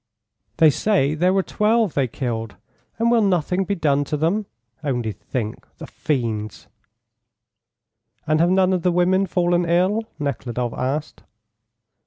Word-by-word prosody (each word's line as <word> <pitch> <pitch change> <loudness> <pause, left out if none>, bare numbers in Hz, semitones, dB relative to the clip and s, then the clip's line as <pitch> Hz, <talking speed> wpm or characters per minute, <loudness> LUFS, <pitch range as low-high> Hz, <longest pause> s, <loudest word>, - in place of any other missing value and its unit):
"They 160 -2 +6
say 155 -4 +1
there 175 +4 +2
were 190 0 +2
12 215 -2 +1
they 135 -2 +1
killed. 115 -4 -4 0.4
And 230 +1 +2
will 235 -1 +4
nothing 185 -1 +1
be 200 - -1
done 145 -4 +1
to 150 - -2
them? 185 +7 0 0.4
Only 120 -6 -1
think! 110 +2 -5
The - - -8
fiends!" 110 - -3 1.6
"And 155 0 +1
have 170 +2 +4
none 185 0 +3
of 180 - 0
the 180 - +2
women 185 +2 +2
fallen 175 0 +1
ill?" 185 +6 +2 0.2
Nekhludoff 125 -4 -3
asked. 145 +4 -3
160 Hz, 140 wpm, -22 LUFS, 130-190 Hz, 1.6 s, They